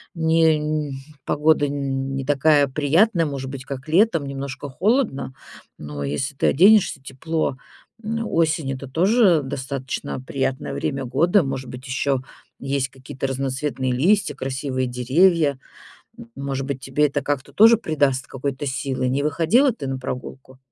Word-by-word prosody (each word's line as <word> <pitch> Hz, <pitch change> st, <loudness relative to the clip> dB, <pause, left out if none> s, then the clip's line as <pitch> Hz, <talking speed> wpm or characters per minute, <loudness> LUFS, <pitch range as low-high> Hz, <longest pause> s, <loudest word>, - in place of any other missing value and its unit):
не 155 Hz, -3 st, +1 dB, 0.2 s
погода 150 Hz, 0 st, +2 dB
н 135 Hz, -1 st, -3 dB
не 135 Hz, -1 st, -3 dB
такая 145 Hz, 0 st, +3 dB
приятная, 165 Hz, -, +2 dB
может 135 Hz, -3 st, -4 dB
быть, 135 Hz, -1 st, -7 dB
как 135 Hz, +2 st, -7 dB
летом 165 Hz, -2 st, +3 dB
немножко 140 Hz, +1 st, -6 dB
холодно, 185 Hz, -, 0 dB, 0.4 s
но 75 Hz, -1 st, -6 dB
если 130 Hz, -, -2 dB
ты -, -, +1 dB
оденешься 190 Hz, -2 st, +5 dB
тепло, 140 Hz, +2 st, -3 dB, 0.5 s
м, 225 Hz, +1 st, -2 dB
осень 155 Hz, -6 st, 0 dB
это 135 Hz, 0 st, -7 dB
тоже 185 Hz, -, +4 dB
достаточно 135 Hz, -1 st, -4 dB
приятное 135 Hz, 0 st, -3 dB
время 135 Hz, -4 st, -3 dB
года. 170 Hz, -, +3 dB
Может 135 Hz, -1 st, -4 dB
быть, 130 Hz, +2 st, -9 dB
ещё 135 Hz, +1 st, 0 dB, 0.4 s
есть 135 Hz, -1 st, -1 dB
какие-то 130 Hz, 0 st, -6 dB
разноцветные 135 Hz, 0 st, -2 dB
листья, 190 Hz, +10 st, +2 dB
красивые 130 Hz, -1 st, -3 dB
деревья. 140 Hz, +4 st, +2 dB, 0.8 s
Может 135 Hz, -1 st, -4 dB
быть, 135 Hz, -2 st, -4 dB
тебе 140 Hz, +3 st, +1 dB
это 145 Hz, -, -2 dB
как-то 145 Hz, -2 st, -3 dB
тоже 225 Hz, +2 st, +7 dB
придаст 145 Hz, -, 0 dB
какой-то 135 Hz, +1 st, -4 dB
силы? 130 Hz, -1 st, -2 dB
Не 135 Hz, +3 st, 0 dB
выходила 170 Hz, -, +3 dB
ты 145 Hz, -11 st, -7 dB
на 135 Hz, 0 st, -3 dB
прогулку? 130 Hz, 0 st, -7 dB
140 Hz, 140 wpm, -22 LUFS, 130-160 Hz, 0.8 s, тоже